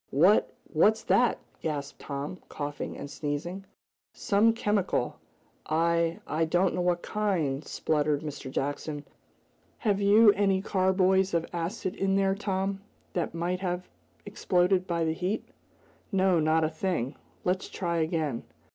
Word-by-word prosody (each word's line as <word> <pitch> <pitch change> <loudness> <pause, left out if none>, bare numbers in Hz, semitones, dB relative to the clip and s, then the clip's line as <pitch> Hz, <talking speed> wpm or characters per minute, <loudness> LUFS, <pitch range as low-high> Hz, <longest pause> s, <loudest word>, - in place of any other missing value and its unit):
"What 175 +10 +4 0.2
what's 215 +8 +4
that?" 245 0 +3 0.2
gasped 145 -3 -4
Tom, 145 +5 -5
coughing 145 -1 -5
and - - -6
sneezing. 150 +6 -4 0.5
"Some 210 +3 +3
chemical 205 - 0 0.5
I 170 +1 +1
I 160 +2 0
don't 175 +4 +2
know 180 - -1
what 175 -1 +1
kind," 170 -10 -1
spluttered 150 -1 0
Mr. 145 -3 -6
Jackson. 145 +2 -3 0.7
"Have 205 -3 0
you 210 +2 +7
any 195 -1 +2
carboys 190 -1 +2
of 165 0 +1
acid 175 +3 -3
in 195 0 0
there 195 0 +3
Tom, 195 -1 -2 0.3
that 170 -2 -2
might 175 +2 -1
have 180 -1 -3 0.4
exploded 180 +1 +1
by 170 -1 0
the 160 - +1
heat?" 185 +5 -2 0.7
"No; 190 -3 +3
not 160 +1 +3
a 155 - +2
thing. 155 -6 -1 0.3
Let's 185 +1 -1
try 170 -2 -2
again." 160 -6 -1
175 Hz, 135 wpm, -28 LUFS, 155-195 Hz, 0.7 s, you